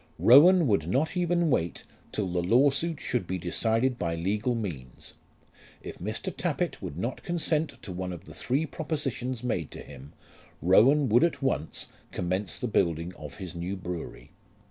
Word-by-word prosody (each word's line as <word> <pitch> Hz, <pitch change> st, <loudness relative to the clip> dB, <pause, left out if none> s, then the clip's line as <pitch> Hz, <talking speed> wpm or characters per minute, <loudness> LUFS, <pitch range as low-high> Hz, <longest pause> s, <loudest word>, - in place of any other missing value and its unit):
Rowan 165 Hz, +8 st, +7 dB
would 100 Hz, -, +1 dB
not 145 Hz, -, 0 dB
even 175 Hz, -2 st, +1 dB
wait 85 Hz, -8 st, 0 dB, 0.3 s
till 105 Hz, -3 st, -1 dB
the 90 Hz, 0 st, -1 dB
lawsuit 140 Hz, -, +2 dB
should 120 Hz, -8 st, -2 dB
be 95 Hz, -, -2 dB
decided 115 Hz, +8 st, 0 dB
by 85 Hz, -1 st, -1 dB
legal 105 Hz, +8 st, 0 dB
means. 75 Hz, -, -6 dB, 0.7 s
If -, -, -8 dB
Mr. -, -, -4 dB
Tappitt -, -, -2 dB
would 70 Hz, -, -6 dB
not 120 Hz, +8 st, -3 dB
consent 165 Hz, -2 st, -1 dB
to 95 Hz, -, -7 dB
one 90 Hz, 0 st, -4 dB
of 85 Hz, -, -8 dB
the -, -, -11 dB
three 140 Hz, +6 st, 0 dB
propositions 135 Hz, -6 st, -3 dB
made 90 Hz, -, -1 dB
to -, -, -9 dB
him, 70 Hz, +3 st, -12 dB, 0.5 s
Rowan 130 Hz, -, +5 dB
would 120 Hz, +4 st, +5 dB
at 170 Hz, -4 st, 0 dB
once 105 Hz, -, -2 dB, 0.2 s
commence 95 Hz, +3 st, -2 dB
the 125 Hz, -, -2 dB
building 85 Hz, -4 st, 0 dB
of 75 Hz, -5 st, -10 dB
his 90 Hz, -3 st, -7 dB
new 90 Hz, +3 st, -4 dB
brewery. 90 Hz, -2 st, -7 dB
110 Hz, 165 wpm, -28 LUFS, 90-140 Hz, 0.7 s, Rowan